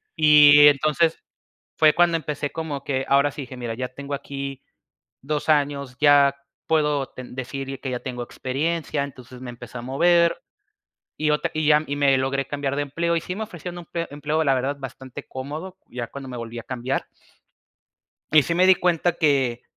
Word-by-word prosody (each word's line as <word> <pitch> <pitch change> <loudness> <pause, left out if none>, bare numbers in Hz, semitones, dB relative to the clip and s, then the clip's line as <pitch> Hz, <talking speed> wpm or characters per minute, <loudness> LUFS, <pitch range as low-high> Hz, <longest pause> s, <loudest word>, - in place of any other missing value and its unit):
Y 145 -1 +8
entonces, 155 +3 +1 0.6
fue 155 -1 +5
cuando 170 -1 +3
empecé 150 -2 -4
como 160 -4 -5
que, 135 -1 -2
ahora 140 +1 +4
sí, 145 - -7
dije: 130 0 -10
"Mira, 120 -2 -4
ya 125 +1 -4
tengo 140 +2 -8
aquí 140 -1 -6 0.6
2 150 +3 -3
años, 140 -3 +1
ya 145 -2 +5 0.3
puedo 150 -3 +1
ten 125 -1 -10
decir 135 +1 -5
que 135 - -4
ya 125 - -3
tengo 125 -2 -5
experiencia". 150 +4 -2
Entonces, 130 -2 -10
me 125 - -7
empecé 120 +1 -10
a 120 - -6
mover, 170 +6 +2 0.8
y 155 0 0
otra 150 - 0
y 155 -1 -1
ya 150 0 +5
y 145 - -2
me 140 -2 +4
logré 135 +1 -1
cambiar 140 -1 -2
de 145 - 0
empleo, 170 +4 -1
y 165 - 0
sí 180 +2 -5
me 220 - -3
ofrecían 175 -2 -8
empe 170 0 -5
empleo, 150 +2 -1
la 140 - +3
verdad, 135 +3 -1
bastante 130 +1 -9
cómodo, 155 +8 -7
ya 120 -1 -5
cuando 140 +2 -9
me 125 - -6
volví 115 0 -6
a - - -9
cambiar. 125 +1 -3 1.3
Y 155 -2 +6
sí 170 - -1
me 180 +2 +4
di 190 - +7
cuenta 175 -1 +1
que 135 -7 +1
140 Hz, 185 wpm, -23 LUFS, 130-155 Hz, 1.3 s, Y